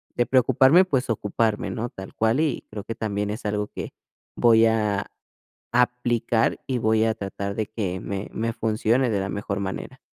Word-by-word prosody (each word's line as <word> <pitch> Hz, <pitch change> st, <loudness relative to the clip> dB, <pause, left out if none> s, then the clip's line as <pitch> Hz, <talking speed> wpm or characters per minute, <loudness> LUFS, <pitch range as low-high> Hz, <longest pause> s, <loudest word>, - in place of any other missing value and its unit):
de 120 Hz, -, +2 dB
preocuparme, 130 Hz, +7 st, +5 dB
pues, 135 Hz, -8 st, -1 dB
ocuparme, 110 Hz, 0 st, 0 dB
¿no?, 120 Hz, +2 st, -3 dB
tal 95 Hz, -3 st, -10 dB
cual, 110 Hz, +4 st, +2 dB
y 155 Hz, -4 st, -1 dB
creo 105 Hz, -2 st, -6 dB
que 115 Hz, -, -5 dB
también 105 Hz, -2 st, -2 dB
es 110 Hz, +1 st, -6 dB
algo 105 Hz, 0 st, -1 dB
que -, -, -7 dB, 0.4 s
voy 115 Hz, -1 st, +5 dB
a 105 Hz, -3 st, 0 dB, 0.7 s
aplicar, 120 Hz, -2 st, +1 dB
y 130 Hz, -, 0 dB
voy 110 Hz, 0 st, +2 dB
a 110 Hz, -, +2 dB
tratar 100 Hz, -1 st, -5 dB
de 110 Hz, -, -1 dB
que 95 Hz, -5 st, -3 dB
me 100 Hz, 0 st, -4 dB
me 115 Hz, +1 st, -2 dB
funcione 115 Hz, +3 st, +1 dB
de 100 Hz, -, +1 dB
la 95 Hz, -, -3 dB
mejor 100 Hz, 0 st, -3 dB
manera. 100 Hz, +6 st, -5 dB
110 Hz, 180 wpm, -24 LUFS, 105-120 Hz, 0.7 s, preocuparme